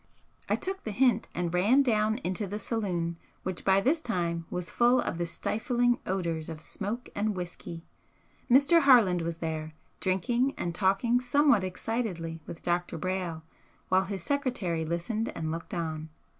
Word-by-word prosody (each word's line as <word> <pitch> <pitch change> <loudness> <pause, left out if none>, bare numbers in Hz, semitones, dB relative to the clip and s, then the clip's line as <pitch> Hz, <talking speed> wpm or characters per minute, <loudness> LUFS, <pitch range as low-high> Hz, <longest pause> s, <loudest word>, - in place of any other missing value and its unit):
I - - +4
took 380 +1 -4
the - - -5
hint 245 +4 +2
and 175 -1 -1
ran 215 +10 +5
down 220 -3 +2
into 185 +3 -1
the 205 +3 -4
saloon, 180 -7 -2 0.3
which 185 -2 -3
by 195 0 +4
this 305 +8 +2
time 170 - -2
was 180 -1 -4
full 245 +1 +4
of 175 - -2
the 170 - -1
stifling 240 +7 0
odours 170 -4 -1
of 160 -1 -6
smoke 210 +9 -5
and 210 0 0
whisky. 175 -2 -7 0.6
Mr. 280 +7 +6
Harland 230 - +6
was 165 0 -3
there, 155 -1 -4 0.2
drinking 235 +8 +1
and 170 - -2
talking 195 +6 +2
somewhat 255 -4 +4
excitedly 185 -4 -3
with 165 - -8
Dr. 175 0 -1
Brayle, 180 -2 -3 0.5
while 185 +1 +3
his 190 -2 -5
secretary 240 - -1
listened 175 +8 -2
and 160 -1 -2
looked 165 +1 -6
on. 160 -2 -3
190 Hz, 155 wpm, -29 LUFS, 170-235 Hz, 0.6 s, Mr